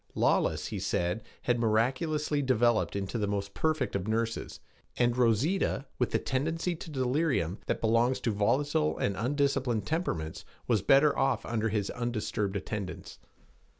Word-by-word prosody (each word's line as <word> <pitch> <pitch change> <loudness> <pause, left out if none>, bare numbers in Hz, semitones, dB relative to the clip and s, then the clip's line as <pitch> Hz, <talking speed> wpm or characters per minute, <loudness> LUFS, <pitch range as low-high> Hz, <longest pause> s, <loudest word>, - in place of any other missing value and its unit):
Lawless, - - +1
he - - -4
said, 90 +5 -1 0.2
had 120 -1 +1
miraculously 135 +7 +1
developed 120 -5 +2
into 100 +3 -2
the 105 - 0
most 100 0 -3
perfect 155 -8 0
of 100 0 -2
nurses, 115 +1 -2 0.4
and 120 -1 +2
Rosita, 130 - +1
with 125 - +2
the - - +1
tendency 160 +6 -1
to 165 - -9
delirium 130 - 0
that - - -1
belongs 115 +3 +2
to 115 - 0
volatile 105 - +1
and 100 - 0
undisciplined 130 -3 0
temperaments, 90 - -2 0.2
was 115 -5 +2
better 140 +2 +5
off 135 0 +1
under 115 -1 -1
his 105 -2 -1
undisturbed 110 -4 -2
attendance. 100 -1 -5
120 Hz, 145 wpm, -30 LUFS, 105-140 Hz, 0.4 s, better